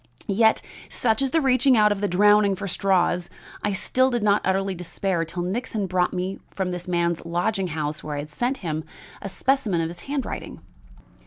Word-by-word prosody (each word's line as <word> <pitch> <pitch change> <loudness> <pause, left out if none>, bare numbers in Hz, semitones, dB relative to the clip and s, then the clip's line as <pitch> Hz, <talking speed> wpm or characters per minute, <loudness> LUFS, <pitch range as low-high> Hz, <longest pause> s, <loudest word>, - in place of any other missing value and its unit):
"Yet, 220 +2 +3 0.3
such 225 +1 +1
is 270 - +1
the 325 +4 +2
reaching 260 -1 +4
out 210 -1 +5
of 205 -1 -1
the 205 - +1
drowning 205 +1 +4
for 200 +2 -5
straws, 180 -2 +1 0.3
I - - +1 0.2
did 255 -3 +3
not 205 0 +3
utterly 195 +1 +1
despair 180 0 -2
till 175 +2 -4
Nixon 210 +2 -2
brought 180 -1 +1
me 185 +1 -3
from 190 -2 -3
this 180 0 -5
man's 170 -1 0
lodging 180 +4 -1
house, 155 -2 -3
where 150 -1 -4
I - - -3
had 150 - -9
sent 245 - -1
him, 155 -1 -2 0.4
a 195 - -5
specimen 230 -5 +1
of 165 0 -1
his 175 +1 -9
handwriting. 280 -4 -4
195 Hz, 185 wpm, -24 LUFS, 175-220 Hz, 0.4 s, out